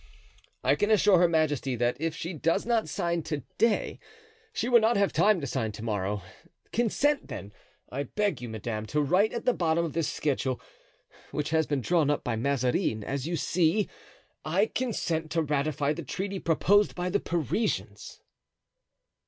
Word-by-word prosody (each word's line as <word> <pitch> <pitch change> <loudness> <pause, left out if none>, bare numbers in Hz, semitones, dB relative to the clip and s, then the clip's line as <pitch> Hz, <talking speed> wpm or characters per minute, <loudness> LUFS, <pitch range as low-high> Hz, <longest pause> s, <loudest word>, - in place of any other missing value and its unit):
"I - - +4
can 205 - +1
assure 205 -3 +5
her 175 - +5
majesty 150 -5 +1
that 120 +1 +1
if 165 -1 -1
she 170 +3 -5
does 165 +1 0
not 230 -2 +1
sign 170 -3 -1
to 150 -3 -4 0.2
day 230 -2 +1 0.5
she 240 - -2
will 245 -1 +6
not 225 +1 +3
have 200 -1 +2
time 210 -3 +4
to - - -3
sign 120 -4 -2
to 105 +1 -8
morrow. 105 -2 -2 0.5
Consent, 275 +5 +1
then, 100 +1 -7 0.4
I 135 - -2
beg 205 +7 -1
you, 120 - -5
madame, 110 0 -4
to 150 - 0
write 185 +9 +3
at 235 - -5
the 250 - +4
bottom 170 -2 +1
of 160 - -5
this 165 -2 0
schedule, 130 -3 -1 0.7
which 150 +1 -3
has 160 -1 +2
been 145 -2 0
drawn 160 +1 +2
up 145 - 0
by 120 - -1
Mazarin, 125 -3 0
as 135 +5 -3
you 170 - -1
see: 170 +5 +1 0.6
"'I 190 +8 +1
consent 170 -10 -1
to 165 -1 +2
ratify 145 0 0
the 170 - -6
treaty 190 +6 -4
proposed 195 +6 +3
by 180 0 -2
the 205 - +2
Parisians. 150 - -2
160 Hz, 175 wpm, -28 LUFS, 135-195 Hz, 0.7 s, will